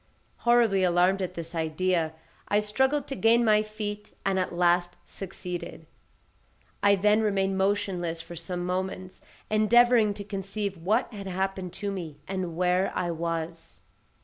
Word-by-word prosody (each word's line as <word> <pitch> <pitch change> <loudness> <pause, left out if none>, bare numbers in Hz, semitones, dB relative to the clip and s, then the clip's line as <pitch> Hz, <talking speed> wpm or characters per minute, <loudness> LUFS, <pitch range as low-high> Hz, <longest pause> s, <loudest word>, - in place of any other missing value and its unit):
Horribly 235 -5 +3
alarmed 180 +2 +3
at 185 -1 -3
this 165 0 -6
idea, 165 0 0 0.3
I 205 - +3
struggled 265 +7 +1
to 275 - -5
gain 235 0 +4
my 215 -1 +5
feet, 210 -1 -6
and 195 -1 +2
at 185 - -1
last 175 0 +2
succeeded. 180 -2 -6 1.0
I 200 0 +5
then 210 +3 +3
remained 195 -2 +1
motionless 185 -4 0
for 170 +1 -9
some 175 +2 -4
moments, 185 0 -4 0.3
endeavouring 220 0 +5
to 200 - -6
conceive 200 0 -4
what 210 +8 0
had 200 -2 -7
happened 190 -1 -2
to 200 -1 -3
me, 165 -7 -6
and 185 -3 -3
where 180 +1 +2
I 175 -1 -1
was. 165 0 -4
190 Hz, 145 wpm, -27 LUFS, 175-210 Hz, 1.0 s, my